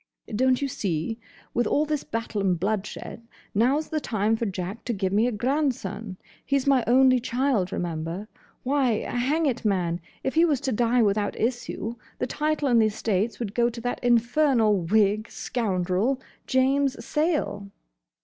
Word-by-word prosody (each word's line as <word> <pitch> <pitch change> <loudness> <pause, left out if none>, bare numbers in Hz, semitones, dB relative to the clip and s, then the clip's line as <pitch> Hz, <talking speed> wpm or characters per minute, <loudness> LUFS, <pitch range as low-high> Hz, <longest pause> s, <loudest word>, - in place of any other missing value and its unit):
"Don't 260 +3 +2
you - - +1
see? 200 - -2 0.3
With 240 - +1
all 300 - +2
this 300 -2 -2
battle 225 -2 -3
and 185 -3 +1
bloodshed, 210 +3 -3 0.3
now's 265 +9 +2
the 310 - -1
time 220 -4 0
for 225 0 -2
Jack 190 +3 -5
to 240 - -1
give 190 -2 -1
me 215 +4 +3
a - - 0
grandson. 225 -5 -2 0.3
He 280 - +1
's 270 - -2
my 270 -3 +4
only 255 +1 +5
child, 245 -6 0
remember. 170 +3 -3 0.4
Why, 260 -4 +1
hang 280 +7 0
it, 255 -4 -1
man, 180 -5 0 0.2
if 265 - -1
he 325 - +4
was 300 -6 +2
to 275 -2 -1
die 235 +1 +3
without 205 0 +1
issue, 240 -1 -2 0.2
the - - -1
title 300 +2 -1
and 235 -3 +5
the 220 - +4
estates 215 0 -1
would 215 -4 -4
go 235 +1 +2
to 235 0 -8
that 245 +1 -3
infernal 240 -1 +3
whig 210 +4 +2
scoundrel, 205 +2 -1 0.3
James 270 +1 +2
Sayle." 300 - -1
235 Hz, 165 wpm, -25 LUFS, 205-265 Hz, 0.4 s, only